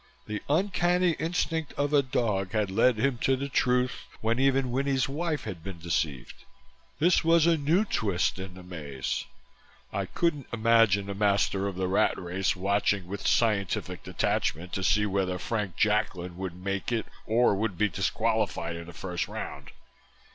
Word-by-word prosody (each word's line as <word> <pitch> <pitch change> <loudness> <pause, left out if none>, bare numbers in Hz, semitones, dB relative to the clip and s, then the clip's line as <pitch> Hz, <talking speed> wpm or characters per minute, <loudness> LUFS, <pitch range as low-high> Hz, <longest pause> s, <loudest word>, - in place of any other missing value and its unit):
The 105 -1 -4
uncanny 180 +1 +2
instinct 160 -2 -1
of 145 +1 -1
a 145 - +6
dog 105 -7 -1
had 105 -3 0
led 115 +4 +3
him 125 +1 +1
to 135 - +2
the 140 +2 -3
truth 125 -1 +1
when 115 +2 0
even 135 -1 +2
Winnie's 135 0 +1
wife 155 +2 -2
had 90 -7 -7
been 95 -1 -6
deceived. 80 -6 -3 0.5
This 175 +3 +3
was 165 0 +5
a 170 -1 +5
new 160 +7 +2
twist 100 - 0
in 95 -1 -7
the 95 - -11
maze. 75 -7 -4 0.7
I 100 -1 -2
couldn't 150 - -1
imagine 115 -3 +4
the 100 - -4
Master 100 -1 +1
of 100 - -4
the 95 0 -1
Rat 100 +4 +2
Race 90 +2 -1
watching 100 0 +1
with 100 +2 -4
scientific 105 -5 +1
detachment 85 +4 -1
to 95 - -2
see 105 +2 +3
whether 95 -2 0
Frank 105 -4 -3
Jacklin 105 -5 0
would 90 -1 -5
make 100 +4 -3
it 115 -2 0 0.2
or 115 0 +4
would 100 -2 -1
be 105 +3 +3
disqualified 105 -3 -1
in 85 0 -8
the 85 - -10
first 90 +1 -3
round. 70 - -7
105 Hz, 165 wpm, -28 LUFS, 95-135 Hz, 0.7 s, a